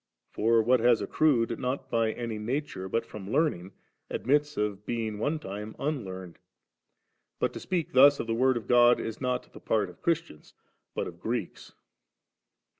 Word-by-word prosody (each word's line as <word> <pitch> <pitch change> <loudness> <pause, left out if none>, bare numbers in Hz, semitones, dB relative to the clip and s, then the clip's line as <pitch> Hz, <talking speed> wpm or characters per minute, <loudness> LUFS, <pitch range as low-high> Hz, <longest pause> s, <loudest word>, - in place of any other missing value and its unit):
For 115 +1 +3
what 125 +2 +4
has 120 0 +4
accrued 115 +1 +1
not 130 +1 -3
by 115 -1 +2
any 115 -3 -4
nature, 120 -4 -3
but 115 - 0
from 100 -2 -9
learning, 120 - 0 0.4
admits 145 +3 0
of 105 -1 -1
bemg 110 -2 -3
one 150 +8 0
time 105 -4 -7
unlearned. 95 - -4 1.0
But - - 0
to - - -6
speak 175 -4 -2
thus 140 +2 +7
of - - -2
the 115 - -1
Word 130 +2 +3
of 110 - -7
God, 120 0 +6
is 115 +2 -5
not 125 -1 -2
the - - -11
part 105 -4 0
of 85 - -22
Christians 165 - -2 0.4
but - - -1
of - - -9
Greeks. - - -4
115 Hz, 165 wpm, -28 LUFS, 105-135 Hz, 1.0 s, thus